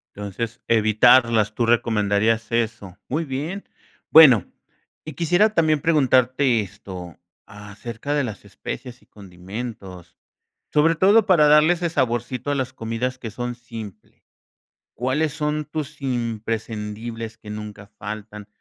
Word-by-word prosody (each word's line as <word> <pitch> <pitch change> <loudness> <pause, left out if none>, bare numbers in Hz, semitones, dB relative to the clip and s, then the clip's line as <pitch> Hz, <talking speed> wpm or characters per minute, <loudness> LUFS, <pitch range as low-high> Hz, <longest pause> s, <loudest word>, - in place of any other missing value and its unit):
Entonces, 110 +4 -5
evitarlas, 110 0 +4
tú 120 - +1
recomendarías 110 -1 +1
eso. 110 -5 -2
Muy 155 +5 -1
bien, 155 +8 -4 0.5
bueno, 135 - +8 0.6
y 155 - -7
quisiera 175 +7 +2
también 155 -5 +2
preguntarte 130 -5 +3
esto, 90 -3 -8 0.3
acerca 105 +6 -7
de 145 -2 +1
las 110 -4 -7
especias 125 -1 -8
y - - -24
condimentos, 95 -1 -9 0.6
sobre 160 +2 +4
todo 200 +6 +5
para 165 -6 +5
darle 150 +3 +6
ese 175 0 -2
saborcito 125 -1 -1
a - - 0
las 130 -1 -3
comidas 120 +2 -3
que 115 - -6
son 120 +3 -4
simples, 115 -4 -11 0.7
¿cuáles 140 +5 0
son 150 0 -2
tus 150 -1 -6
imprescindibles 115 -2 -4
que 105 -1 -10
nunca 105 -1 -8
faltan, 105 0 -7
120 Hz, 125 wpm, -22 LUFS, 105-145 Hz, 0.7 s, bueno